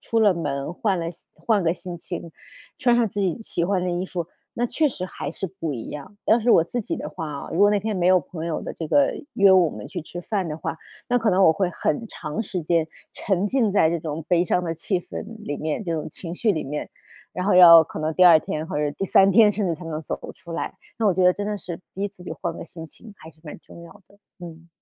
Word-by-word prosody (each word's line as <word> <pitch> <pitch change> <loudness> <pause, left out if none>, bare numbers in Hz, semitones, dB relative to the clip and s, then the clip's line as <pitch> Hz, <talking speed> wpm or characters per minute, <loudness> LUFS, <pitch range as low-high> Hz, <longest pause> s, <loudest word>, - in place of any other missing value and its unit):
出 230 - -1
了 205 -4 +5
门， 140 -1 -3
换 195 -3 0
了 165 - -3
心 170 - -17
换 215 -5 +1
个 165 - +2
心 175 -1 -7
情， 170 -1 -7 0.5
穿 245 -1 +3
上 235 -3 +2
自 205 - -4
己 185 0 0
喜 170 -5 -1
欢 190 0 +1
的 180 - -1
衣 175 +2 -2
服， 175 -3 -4 0.3
那 240 - -1
确 305 +5 +1
实 185 -8 -5
还 145 - -6
是 190 - -4
不 165 -4 -5
一 115 - -7
样。 150 +8 -9
要 220 - +5
是 235 - +2
我 165 - +6
自 240 +7 -3
己 - - -3
的 - - -5
话 160 - -6
啊， 140 -1 -6
如 165 - -2
果 205 0 +6
那 205 - +2
天 215 +1 -2
没 175 0 +1
有 185 0 +6
朋 165 -2 -7
友 165 - -3
的 - - -5
这 160 - -6
个， 285 - +3 0.2
约 195 -1 +6
我 180 -3 +5
们 - - -8
去 180 - -5
吃 175 +2 -8
饭 190 -2 -2
的 150 - -4
话， - - -4 0.3
那 245 0 +3
可 225 -2 +1
能 190 +1 +4
我 160 - +7
会 185 +2 0
很 180 +6 -2
长 150 +8 -5
时 185 -4 -4
间 160 0 +1 0.2
沉 195 0 -1
浸 230 -2 +1
在 165 -5 +4
这 170 - -1
种 155 0 -5
悲 175 -1 +3
伤 180 0 +1
的 165 -1 -2
气 180 +3 -1
氛 - - -7 0.2
里 145 - -3
面， 155 +5 -2
这 170 - -2
种 155 -1 -4
情 170 +2 -7
绪 215 +2 +1
里 155 - -2
面， 150 +2 -4 0.4
然 180 - -3
后 205 - +3
要 170 -2 +10
可 - - -8
能 155 0 -1
第 185 - +5
2 170 -3 +9
天 155 +1 -4
或 - - -4
者 150 -1 0
第 195 - -4
3 195 +1 +5
天 215 +1 +7
甚 205 -1 -1
至 170 - 0
才 165 - -11
能 155 -1 -4
走 - - -4
得 - - -8
出 170 - -11
来， - - -4 0.2
那 220 - +1
我 195 - +4
觉 185 0 +2
得 180 - +6
真 205 - -5
的 210 0 -2
是 175 -2 -7
逼 200 +2 -2
自 195 -3 -16
己 - - -7
换 170 -2 -4
个 - - -7
心 165 -1 -10
情 215 +6 -14
还 160 -2 -13
是 155 - -29
蛮 150 - -8
重 170 - -14
要 170 +1 -12 0.2
的。 200 - -23 0.2
嗯。 170 -1 -11
175 Hz, 295 characters per minute, -23 LUFS, 165-200 Hz, 0.5 s, 要